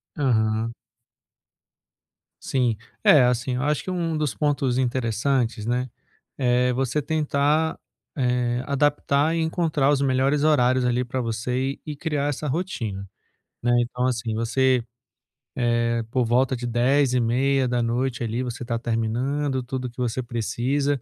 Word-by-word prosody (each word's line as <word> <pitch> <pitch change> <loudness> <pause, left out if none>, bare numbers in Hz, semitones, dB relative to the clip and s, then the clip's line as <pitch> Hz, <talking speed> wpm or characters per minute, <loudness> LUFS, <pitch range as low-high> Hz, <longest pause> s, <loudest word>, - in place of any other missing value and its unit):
Aham. 115 -5 +1 1.7
Sim, 125 -5 0 0.3
é, 145 -5 +7
assim, 125 +1 +1
eu 125 - -2
acho 150 0 0
que - - -6
um 165 -3 -1
dos 150 -7 -1
pontos 135 -3 0
interessantes, 120 -2 0
né, 125 +1 -1 0.5
é 125 -1 +2
você 135 +3 0
tentar, 150 +1 +1 0.4
eh, 125 -2 0
adaptar 145 +2 +1
e 165 - 0
encontrar 160 -4 +1
os 140 -1 +2
melhores 135 +2 +2
horários 130 -4 +3
ali, 125 +1 +1
para 125 +1 -4
você 115 +1 -2 0.2
e - - -18
e 150 -1 -5
criar 145 -2 -1
essa 145 +1 -3
rotina, 115 - -3 0.5
né. 120 0 +1
Então 125 +1 -2
assim, 115 -3 -1
você, 125 +2 +2 1.0
eh, 115 0 0
por 125 -2 +1
volta 125 +3 +2
de 120 0 -4
22h30 125 -1 +1
ali, 115 +3 -2
você 125 0 -5
tá 115 -1 -1
terminando 125 +4 -1
tudo 125 0 -4
que 120 - -21
você 125 0 -1
precisa. 125 +4 -1
125 Hz, 135 wpm, -24 LUFS, 120-140 Hz, 1.7 s, é